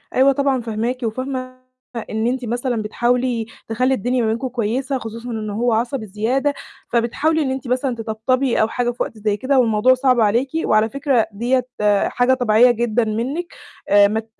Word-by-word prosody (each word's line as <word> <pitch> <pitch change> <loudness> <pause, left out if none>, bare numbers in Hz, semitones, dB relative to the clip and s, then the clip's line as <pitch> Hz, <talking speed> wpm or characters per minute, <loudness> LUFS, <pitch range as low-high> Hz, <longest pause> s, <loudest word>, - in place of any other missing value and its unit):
أيوه 265 +2 +5
طبعًا 275 -2 +1
فاهماكِ، 230 +2 -2
وفاهمة 255 +2 -4 0.5
إن 220 +1 -1
أنتِ 250 0 -2
مثلًا 240 0 -2
بتحاولي 240 +2 0 0.2
تخلّي 255 +4 +1
الدنيا 250 +1 0
ما 225 - +1
بينكم 230 +4 -1
كويسة 255 +3 -2
خصوصًا 230 0 -7
إن 220 -2 -4
هو 230 +3 0
عصبي 235 +1 -1
زيادة، 235 +8 0 0.4
فبتحاولي 285 +7 +1
إن 270 -3 -1
أنتِ 265 -1 -5
مثلًا 255 +1 0
تطبطبي 230 +3 0
أو 220 - +3
حاجة 240 +1 -1
في 245 - -2
وقت 225 - -8
زي 210 -1 -1
كده 265 +3 +1
والموضوع 230 +1 +4
صعب 255 -1 +2
عليكِ، 230 +5 +2 0.2
وعلى 215 +1 +3
فكرة 275 -3 +1
ديّة 245 +5 0 0.4
حاجة 245 +1 +2
طبيعية 245 -1 +4
جدًا 240 0 0
منِّك 245 +11 -3 0.4
آآ 205 0 +6
ما 215 +2 -1
ت 220 - -9
240 Hz, 175 wpm, -20 LUFS, 220-260 Hz, 0.5 s, آآ